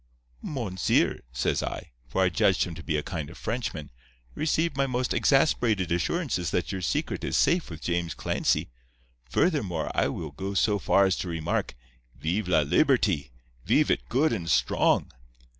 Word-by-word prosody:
"'Monseer,' 110 -11 0
says 65 0 0
I—for - - -4
I 95 - +3
judged 85 - +2
him 85 - -5
to 80 - -8
be 80 -2 -1
a 75 - -2
kind 80 -6 -5
of - - -12
Frenchman—'receive 75 - -3
my 135 0 +1
most 125 -1 -1
exasperated 115 - +2
assurances 90 - 0
that 90 - -1
your 95 -1 -4
secret 90 - -2
is - - 0
safe 170 +4 +2
with 80 -2 -9
James 85 -1 -1
Clancy. - - 0 0.6
Furthermore, 100 - 0
I - - +2
will - - -5
go 100 +1 -5
so 105 +1 +2
far 100 0 +4
as 95 -1 +2
to - - -4
remark, 85 -2 -2 0.4
Veev 90 +8 -1
la 85 -4 +4
Liberty—veev 70 - +1
it - - -1
good 135 +3 +2
and 85 -7 -3
strong. 70 -3 +2
90 Hz, 155 wpm, -27 LUFS, 75-120 Hz, 0.6 s, far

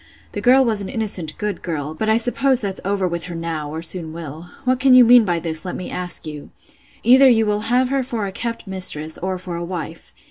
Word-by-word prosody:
The - - -5
girl 260 +2 +5
was 220 -3 +2
an 195 - -5
innocent, 200 - -3
good 210 -3 -3
girl; 155 -3 -4
but 215 +7 -2
I 220 - +4
suppose 250 +2 +2
that's 195 -3 -4
over 195 -1 0
with 170 -1 -4
her 175 -1 -7
now, 165 -3 -4
or 160 +2 -6
soon 165 -1 -1
will. 160 0 -8 0.2
What 255 0 +1
can 265 -1 +5
you 250 -1 +8
mean 240 -1 +7
by 175 -3 0
this, 160 -1 -5
let 180 - -5
me 185 - -6
ask 180 -1 -2
you? 150 -2 -8 0.5
Either 260 +3 +7
you 225 -2 +3
will 210 0 0
have 250 +1 +2
her 275 0 0
for 235 -5 -3
a 195 - -4
kept 230 +4 -5
mistress, 170 -5 0
or 185 +1 -3
for 180 -1 -6
a 170 - -4
wife. 170 - -7
190 Hz, 240 wpm, -20 LUFS, 165-235 Hz, 0.5 s, you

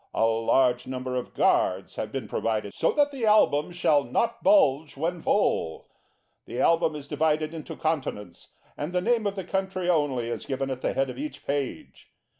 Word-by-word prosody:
A - - +3
large 120 +2 +2
number 130 0 -4
of 125 - -4
guards 95 +1 +2
have 110 - -5
been 135 - -4
provided 110 -3 -2
so - - +1
that 290 -1 +2
the 255 -5 -2
Album 175 -7 +4
shall 155 -5 +2
not 230 - -1
bulge 155 - +3
when 170 +3 -2
full. 85 - 0 0.6
The 120 - -5
Album 165 +1 +3
is 145 -1 -8
divided 155 +1 0
into 160 -2 -7
Continents, 130 - -3 0.3
and 150 +5 -5
the 180 - +2
name 225 +1 +1
of 200 - -3
the 190 - -4
country 190 0 -1
only 140 -7 0
is - - -5
given 135 0 -2
at 130 -1 -5
the - - -1
head 135 -1 0
of 125 - -10
each 145 -1 -6
page. 140 -2 -4
145 Hz, 185 wpm, -26 LUFS, 130-175 Hz, 0.6 s, Album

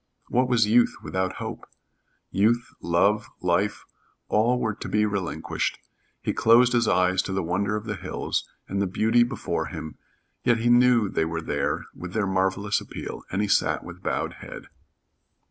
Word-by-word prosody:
What 125 +1 +2
was 115 -3 +4
youth 115 +3 +4
without 95 0 -1
hope? - - -7 0.6
Youth, 115 +5 +2
love, 100 +5 +2
life, 90 +3 0 0.4
all 120 +4 +3
were 110 -3 0
to - - -7
be 105 0 +2
relinquished. 100 -4 -2 0.5
He - - 0
closed 120 +2 +5
his 120 -2 +3
eyes 90 -1 +3
to - - -6
the 95 -1 -1
wonder 100 +5 0
of 105 +1 -4
the 105 -1 -3
hills 95 0 -3 0.2
and 100 0 -2
the 100 - +1
beauty 110 +6 +2
before 120 - -1
him, 80 - -8 0.4
yet 120 -2 +3
he 120 +1 +2
knew 120 -3 +5
they 80 - 0
were 80 0 -3
there 70 -3 -2
with 90 0 -8
their 110 -2 +1
marvelous 95 +2 0
appeal, - - -7
and 100 +3 0
he - - 0
sat 100 - +2
with - - -10
bowed - - -2
head. - - -9
105 Hz, 170 wpm, -25 LUFS, 95-115 Hz, 0.6 s, closed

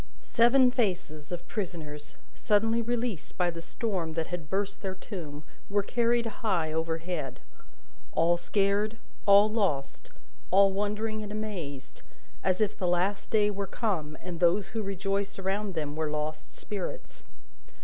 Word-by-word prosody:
Seven 250 +2 +5
faces 180 - -1
of 175 -1 -5
prisoners, 160 -8 -5 0.2
suddenly 225 +2 +2
released 235 -5 -2
by 175 -1 +2
the 165 0 -7
storm 175 -3 -2
that 165 0 -1
had 165 -4 -5
burst 200 +1 -1
their 190 -1 -3
tomb, 160 -7 -7 0.3
were 200 0 +2
carried 235 +2 +2
high 190 -8 0
overhead: 160 -2 -2 0.7
all 170 +1 +4
scared, 200 +4 +1 0.3
all 200 +1 +8
lost, 190 -12 -1 0.4
all 195 +1 +6
wondering 210 +2 -1
and 210 -1 -6
amazed, 175 -11 -5 0.4
as 185 -1 +2
if 215 -1 +1
the 185 - -1
Last 180 +3 +1
Day 210 -2 +4
were 200 -1 -3
come, 175 -9 -2
and 175 -2 -5
those 185 +3 +3
who 220 +2 -2
rejoiced 195 0 -1
around 195 0 -1
them 150 -2 -2
were 155 -1 -1
lost 150 +1 -3
spirits. 210 - -5
195 Hz, 140 wpm, -29 LUFS, 165-210 Hz, 0.7 s, all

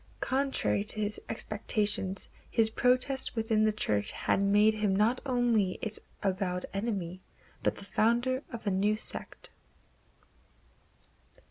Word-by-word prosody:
Contrary 270 -6 0
to 215 +1 -2
his 210 0 -1
expectations, 210 -3 +1 0.2
his 220 -1 +4
protest 255 +3 +2
within 220 -1 +1
the 215 - +4
Church 105 - 0
had - - 0
made 205 +2 +4
him 210 -3 0
not 220 +5 +2
only 235 -7 +2
its 215 -1 -4 0.2
avowed 185 -2 -1
enemy, 195 -4 -3 0.4
but - - +1
the 200 - -10
founder 240 +6 +1
of 230 -2 -7
a 200 - +1
new 200 +3 +2
sect. 215 - -4
215 Hz, 125 wpm, -30 LUFS, 195-230 Hz, 0.4 s, his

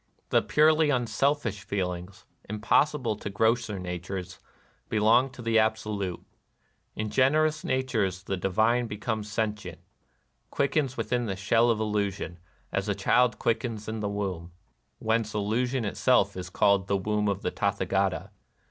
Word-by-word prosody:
The - - +4
purely 155 0 +4
unselfish 125 -2 0
feelings, 95 -1 -4 0.2
im 105 +1 -4
possible 130 0 +2
to 105 - -5
grosser 110 +1 +1
natures, 90 0 -5 0.5
belong 115 +5 +4
to 125 -2 -11
the 115 -1 +3
Absolute. 105 -4 -1 0.7
In 110 -1 -3
generous 155 +4 +2
natures 110 -8 -1
the 95 - -2
divine 110 +6 +1
be 105 -1 -6
comes 105 -1 -3
sentient, 105 -2 -3 0.4
— - - -45
quickens 140 -2 0
within 120 +1 -1
the 95 - -2
shell 115 +5 +3
of 115 -2 +2
illusion, 100 -5 -2 0.3
as 100 +1 -1
a 100 - +1
child 120 +5 +3
quickens 115 -2 -2
in 110 0 -3
the 105 -1 -2
womb 95 -4 -4 0.4
(whence 110 -1 -1
illusion 115 +4 0
itself 100 - +2
is 90 0 -6
called 100 +1 +2
The 100 - +1
"Womb 105 +2 0
of 100 -1 -1
the - - -1
Tathagata). - - -1
110 Hz, 145 wpm, -27 LUFS, 100-120 Hz, 0.7 s, The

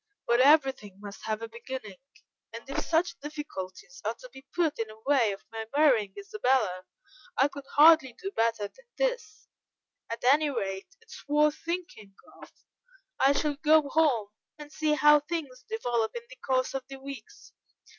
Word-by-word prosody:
But 235 +1 +3
everything 270 -8 +4
must 200 -1 -10
have 220 0 -2
a - - -4
beginning, 230 -3 -8 0.5
and 230 +2 -9
if 275 - -2
such 335 +2 0
difficulties 190 -12 -8
are 220 +2 -2
to 255 - -13
be 265 - -11
put 330 -6 0
in 225 - -1 0.2
way 265 -7 +3
of 195 - -9
my 225 -1 -5
marrying 245 -10 +3
Isabella, 260 - 0 0.5
I 270 - +5
could 280 -1 -10
hardly 305 -4 +7
do 385 +11 -6
better 230 - 0
than - - -23
this; - - -2 0.6
at 230 - -5
any 290 +4 +4
rate, 195 -7 -3
it - - -23
is - - -10
worth 300 +1 +3
thinking 335 - -5 0.3
of. - - -13 0.7
I 275 +1 +5
shall 290 0 -1
go 305 -1 +4
home 270 -10 +2 0.3
and 295 -1 -11
see 310 -1 +1
how 295 0 +6
things 295 -4 -5
develop 240 - -1
in 235 - -5
the - - -10
course 255 0 0
of 270 -1 -3
the 270 - -9
weeks. 275 - -11
270 Hz, 165 wpm, -28 LUFS, 225-305 Hz, 0.7 s, hardly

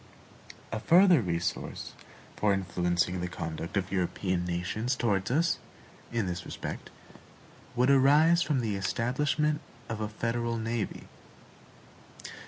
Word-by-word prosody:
A 110 - -2
further 175 - +6
resource 85 -3 -3 0.4
for 105 -1 +2
influencing 90 -1 0
the 90 - -1
conduct 85 +1 -5
of 95 -1 -1
European 90 -1 -1
nations 90 +9 -1
toward 100 -6 0
us, 165 +7 +2 0.5
in 115 -3 0
this 90 0 -3
respect, - - -6 0.9
would 125 +3 +4
arise 150 +5 +5
from 145 -6 +1
the 110 -3 -1
establishment 130 +10 0 0.3
of 110 -1 -3
a 105 - -2
federal 115 +2 -2
navy. 115 -1 -3
110 Hz, 115 wpm, -29 LUFS, 90-130 Hz, 0.9 s, further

